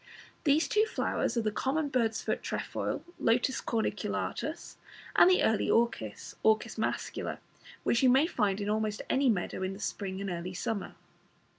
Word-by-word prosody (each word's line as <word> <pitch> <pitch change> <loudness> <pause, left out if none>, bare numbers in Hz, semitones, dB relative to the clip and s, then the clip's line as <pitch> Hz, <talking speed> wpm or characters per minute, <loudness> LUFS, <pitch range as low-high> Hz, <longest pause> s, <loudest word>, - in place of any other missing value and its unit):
These 300 +2 +4
two 430 +1 +3
flowers - - -1
are 230 - +2
the 215 - 0
common 285 +7 0
Bird's 230 -4 0
foot - - -1
trefoil - - -3 0.2
(Lotus 250 +3 +2
corniculatus), 225 -2 -2 0.4
and - - +8
the 370 - +4
Early 220 - +2
Orchis 230 - 0
(Orchis 220 +1 +2
mascula), 220 - -2 0.5
which 235 - +2
you 260 - +6
may 265 +5 +5
find 210 - 0
in 205 - -3
almost 215 0 -1
any 270 0 +3
moist 195 -6 0
meadow - - -5
in 185 +1 -2
the 195 - -10
spring 195 -3 -4
and 195 -1 -3
early 175 +1 -4
summer. 200 +2 -3
220 Hz, 165 wpm, -30 LUFS, 200-260 Hz, 0.5 s, and